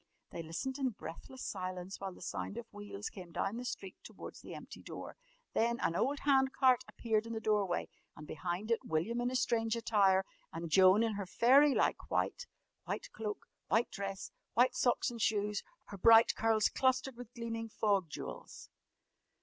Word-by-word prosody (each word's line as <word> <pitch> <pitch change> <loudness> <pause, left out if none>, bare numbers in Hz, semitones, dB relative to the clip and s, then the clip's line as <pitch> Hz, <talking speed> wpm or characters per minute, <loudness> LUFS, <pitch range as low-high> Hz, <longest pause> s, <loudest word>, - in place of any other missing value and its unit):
They 170 - -5
listened 260 - -4
in 265 -2 +1
breathless 220 +5 -9
silence, 185 +1 -5
while 195 -1 -4
the 180 - -12
sound 200 - -4
of 235 - -5
wheels 205 0 -6
came 180 -4 -10
down 195 +6 -2
the 245 - -4
street 195 -7 -5
towards - - -10
the - - -8
empty - - -10
door. - - -8 0.4
Then 235 +1 +1
an 165 - 0
old 280 +9 0
hand 265 -2 +3
cart 255 -2 +4
appeared 225 -1 -1
in 230 - -4
the 225 - -2
doorway 210 -5 +1 0.3
and 150 - -10
behind 180 +8 -4
it 230 - +3
William 195 +10 -1
in 245 - +1
his 255 0 +1
strange 225 -1 +1
attire, 200 -4 +3 0.3
and 165 0 -5
Joan 190 +4 +6
in 225 -1 0
her 200 -2 -4
fairy 275 +7 +5
like - - +1
white - - -1 0.4
white - - -4
cloak, 210 -2 -5 0.2
white 225 +3 +2
dress, 195 -1 -5 0.2
white 250 +1 +5
socks 245 -1 +1
and 235 -1 -6
shoes 210 -1 +1 0.3
her 200 - -8
bright 225 +3 +7
curls 220 -1 +3
clustered 260 0 +1
with 245 -1 -10
gleaming 230 -1 -4
fog 200 -5 +1
jewels. - - -8
220 Hz, 180 wpm, -34 LUFS, 195-240 Hz, 0.4 s, bright